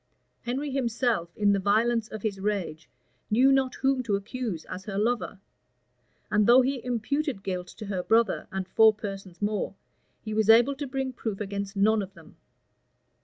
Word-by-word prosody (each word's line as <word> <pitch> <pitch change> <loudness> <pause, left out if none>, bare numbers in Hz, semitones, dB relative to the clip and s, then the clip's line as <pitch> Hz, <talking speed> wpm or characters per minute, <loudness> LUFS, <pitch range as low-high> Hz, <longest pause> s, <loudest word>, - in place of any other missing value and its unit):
Henry 270 +4 -3
himself, 235 -8 0
in 205 -1 +3
the 200 - +1
violence 220 +3 +2
of 220 -2 -8
his 205 -3 -2
rage, 190 -6 -3 0.4
knew 255 +5 +5
not 265 -1 +2
whom 270 -1 +1
to 225 -5 0
accuse 200 -3 -4
as 190 +1 -8
her 195 -2 -4
lover; 225 -2 -1 0.9
and 210 0 +3
though 250 +2 +7
he 260 -1 -2
imputed 250 0 -2
guilt 180 -2 -3
to 215 - -10
her 195 -3 -2
brother, 225 +1 +2
and 190 -1 -3
four 220 +1 +5
persons 195 -3 -7
more, 210 0 -1 0.5
he 215 - -5
was 220 0 +1
able 240 +5 +6
to 280 +1 -5
bring 265 0 -3
proof 220 -5 -4
against 200 -1 -4
none 210 +2 +3
of 195 0 -8
them. - - -16
215 Hz, 170 wpm, -27 LUFS, 200-250 Hz, 0.9 s, though